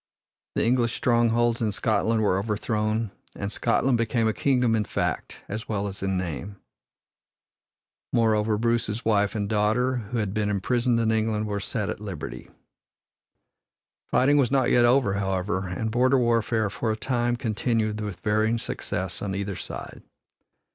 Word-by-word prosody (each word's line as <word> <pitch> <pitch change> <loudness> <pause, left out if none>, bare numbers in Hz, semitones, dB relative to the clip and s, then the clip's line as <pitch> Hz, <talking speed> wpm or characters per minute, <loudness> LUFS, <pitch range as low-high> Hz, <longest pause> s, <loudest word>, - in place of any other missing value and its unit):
The - - +1
English 120 -1 +2
strongholds 120 -1 +2
in 110 -2 +1
Scotland 110 +2 +1
were 95 -2 +2
overthrown, 110 +1 -1 0.2
and 100 0 -4
Scotland 120 +2 +1
became 115 0 +1
a 110 - +1
kingdom 125 -2 +2
in 110 - +1
fact - - -3
as 110 +4 -6
well 100 -2 -1
as 100 0 -5
in 95 -1 0
name. 90 +2 -4 1.6
Moreover, 110 -2 +2
Bruce's 115 -1 0
wife 105 -2 +2
and 100 -2 -1
daughter, 110 +5 +1
who 125 - -2
had 105 -4 -1
been 105 -1 0
imprisoned 120 +4 +1
in 115 -1 +2
England, 110 -1 0
were 105 -1 -2
set 105 +1 -3
at - - -4
liberty. 95 -8 -7 1.6
Fighting 145 +3 +3
was 135 -5 +3
not 135 -2 +2
yet 120 -1 +5
over, 120 -4 +3
however, 95 -1 -1
and 110 +5 -3
border 130 +3 +3
warfare 115 -3 +1
for 115 +1 -1
a - - -1
time 120 0 0
continued 110 -2 -1
with 105 -4 -5
varying 110 +2 +2
success - - -4
on 100 -2 -3
either 100 0 -3
side. - - -7
110 Hz, 155 wpm, -26 LUFS, 105-120 Hz, 1.6 s, yet